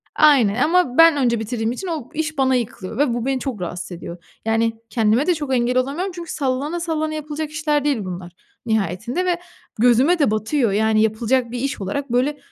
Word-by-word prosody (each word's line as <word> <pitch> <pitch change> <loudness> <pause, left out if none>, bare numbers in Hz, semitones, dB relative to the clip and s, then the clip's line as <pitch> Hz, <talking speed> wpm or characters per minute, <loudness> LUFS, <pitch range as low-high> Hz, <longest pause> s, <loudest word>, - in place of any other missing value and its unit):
aynen, 260 -9 +5
ama 330 -6 +2
ben 330 -2 +7
önce 235 -4 +1
bitirdiğim 225 0 -2
için 365 +9 -5
o 300 -7 -4
iş 315 -1 -3
bana 265 -1 +3
yıkılıyor 225 -3 -4
ve 275 -4 +2
bu 240 0 -2
beni 270 -1 0
çok 245 -9 -4
rahatsız 175 +1 -5
ediyor. 170 0 -8 0.2
Yani, 225 0 +1 0.2
kendime 230 +6 +2
de 355 - +3
çok 290 -4 -3
engel 245 +1 +1
olamıyorum 295 +9 -1
çünkü 340 -2 -7
sallana 280 +4 -2
sallana 315 -2 -2
yapılacak 305 0 -4
işler 300 -2 0
değil 280 -6 +1
bunlar 180 -1 -6 0.3
nihayetinde 220 - -1
ve 355 -1 +1 0.4
gözüme 250 +9 +4
de 280 -7 +3
batıyor. 220 +2 0
Yani, 215 +1 +2
yapılacak 230 +3 +1
bir 245 - -4
iş 270 -3 -3
olarak, 245 +7 -3
böyle, 265 +4 +1
255 Hz, 190 wpm, -21 LUFS, 220-300 Hz, 0.4 s, ben